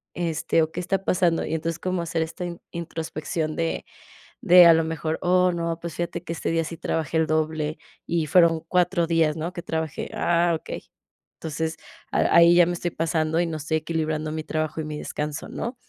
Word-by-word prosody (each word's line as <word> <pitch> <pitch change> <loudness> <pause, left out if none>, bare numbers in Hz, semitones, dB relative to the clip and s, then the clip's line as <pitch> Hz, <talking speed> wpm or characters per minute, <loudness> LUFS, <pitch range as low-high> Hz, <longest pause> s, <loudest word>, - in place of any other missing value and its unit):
Este, 165 -1 +1
¿o 160 - -3
qué - - -5
está 195 +2 -1
pasando? 175 -3 +2
Y - - -4
entonces 160 0 -2
como 185 -1 -1
hacer 165 -1 -1
esta 165 +2 -6
in 170 -1 -6
introspección 160 -1 -4
de 165 -1 -2 0.6
de 180 -2 +8
a 165 - +9
lo 165 0 +3
mejor, 160 0 -2
oh 180 0 +3
no, 170 -1 -2
pues, 170 -1 -6
fíjate 170 0 -3
que 165 - -4
este - - -3
día 165 0 +1
sí 165 +1 -6
trabajé 160 -1 -2
el 160 - +3
doble 155 0 -1 0.3
y 170 -2 0
fueron 165 0 +4
4 180 -1 +2
días, 165 -2 +2
¿no? 165 +2 -3
Que 175 - -5
trabajé, 160 -2 -3
ah, 170 0 +2
okey. - - -7 0.5
Entonces, 160 0 -3 0.3
a - - +2
ahí 170 0 +7
ya 175 - +7
me 175 - -1
estoy 175 0 -2
pasando 160 0 0
y 175 - +2
no 160 -1 -3
estoy 155 +1 -1
equilibrando 155 -1 -2
mi 155 0 -4
trabajo 155 0 -2
y - - -5
mi 150 -1 -5
descanso, 150 0 -4
¿no? 235 +3 -4
165 Hz, 205 wpm, -24 LUFS, 155-170 Hz, 0.6 s, a